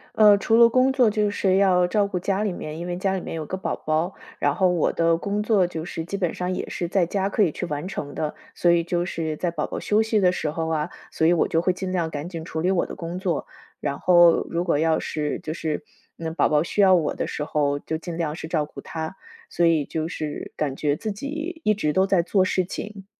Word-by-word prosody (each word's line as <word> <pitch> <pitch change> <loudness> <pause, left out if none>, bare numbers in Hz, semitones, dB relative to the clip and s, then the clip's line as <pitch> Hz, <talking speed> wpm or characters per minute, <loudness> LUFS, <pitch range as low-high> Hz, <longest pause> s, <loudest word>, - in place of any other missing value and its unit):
呃， 210 -2 +7
除 225 +3 +2
了 235 0 +8
工 255 +2 +3
作 250 -5 +4
就 210 -1 +1
是 190 -2 +2
要 180 -2 +4
照 205 +2 +2
顾 195 -2 -3
家 195 +3 0
里 210 - 0
面， 155 -3 -6
因 170 - -5
为 175 0 -3
家 190 +1 0
里 185 - -3
面 - - -6
有 155 -2 -5
个 190 - -3
宝 190 - -2
宝， 160 +4 -1 0.2
然 145 0 +1
后 185 +3 +3
我 175 -3 +2
的 165 0 +2
工 200 +3 -2
作 210 -4 +3
就 165 -2 -5
是 165 - -5
基 200 +4 -4
本 180 -4 0
上 180 +1 -2
也 - - -4
是 175 - -3
在 185 +1 +2
家 195 +2 0
可 210 - 0
以 175 - +4
去 - - -4
完 150 +3 -4
成 145 -6 -5
的， 150 -1 -3 0.2
所 175 - +2
以 170 0 +4
就 175 +1 -1
是 160 -3 -3
在 175 - -1
宝 155 -3 -2
宝 - - -5
休 215 +1 +2
息 220 -1 +1
的 180 -2 +4
时 155 -4 -2
候 160 +1 -3
啊， 155 -1 0 0.2
所 160 - 0
以 170 - +5
我 170 - +2
就 165 +1 +1
会 185 - +2
尽 185 0 -4
量 170 -3 -1
赶 150 +3 -5
紧 165 -2 -6
处 160 -2 -4
理 180 - +1
我 190 -2 +2
的 - - -8
工 170 +1 -5
作， 180 -6 -2 0.3
然 140 -1 -2
后 175 -2 +5
如 170 +1 0
果 170 -5 +1
要 160 0 +2
是 150 -1 -3
就 155 - -5
是， 155 -1 -3 0.4
嗯， 160 -1 -3
宝 - - +3
宝 150 -1 +3
需 170 - -4
要 195 -2 +7
我 165 -4 +2
的 - - -2
时 150 - -4
候， 145 -2 0
就 160 - -3
尽 165 +1 -6
量 160 -3 -2
是 160 - -7
照 160 -2 0
顾 150 - -11
他， 160 +2 -5 0.3
所 175 - +1
以 165 -3 +3
就 160 +2 -3
是 155 -3 -5
感 140 -3 -2
觉 145 0 0
自 215 +7 -4
己 310 - -5
一 215 - +4
直 175 -8 0
都 190 +4 +3
在 190 -3 +3
做 185 +2 +2
事 185 0 +1
情。 195 +2 -7
175 Hz, 285 characters per minute, -24 LUFS, 160-195 Hz, 0.4 s, 了